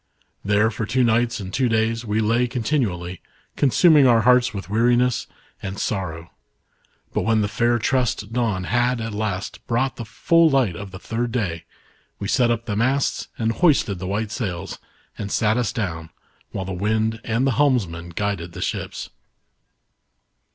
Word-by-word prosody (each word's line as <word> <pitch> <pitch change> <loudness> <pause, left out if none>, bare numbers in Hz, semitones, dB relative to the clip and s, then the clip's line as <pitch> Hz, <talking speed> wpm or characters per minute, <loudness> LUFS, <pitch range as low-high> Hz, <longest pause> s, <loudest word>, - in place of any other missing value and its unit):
There 105 +2 +2
for 110 0 -4
two 125 +3 +2
nights 120 0 +2
and 95 -1 -7
two 125 -1 +1
days, 115 +1 +1
we 110 -1 0
lay 115 +3 +2
continually, 110 - -2 0.3
consuming 145 - +5
our 115 -2 +5
hearts 125 +2 +4
with 100 -2 -6
weariness 120 +4 +2 0.3
and 95 +1 -5
sorrow. 85 -6 -3 0.8
But - - +1
when 110 -1 +2
the 105 - +1
fair 120 +3 +1
tressed 115 -3 -1
dawn 110 -6 0
had, 120 +4 +1
at 115 -1 -4
last, 105 -2 -3
brought 120 +2 0
the 120 - -5
full 165 +9 +3
light 130 - +2
of 100 +3 -7
the 95 - -9
third 115 +4 -3
day, 90 -9 -2 0.5
we 100 - -4
set 125 +1 +3
up 115 0 -1
the 105 - -2
masts 130 +5 0
and 115 -1 0
hoisted 125 - +2
the 95 - -5
white 105 +2 -2
sails 95 -6 -4 0.4
and 100 -1 -4
sat 110 -1 +2
us 120 -3 0
down, 85 -10 -4 0.4
while 95 - -4
the 95 - -4
wind 110 +4 0
and 115 +3 0
the 135 - +3
helmsman 110 - +1
guided 90 -2 -3
the - - -7
ships. - - -4
110 Hz, 165 wpm, -22 LUFS, 100-120 Hz, 0.8 s, consuming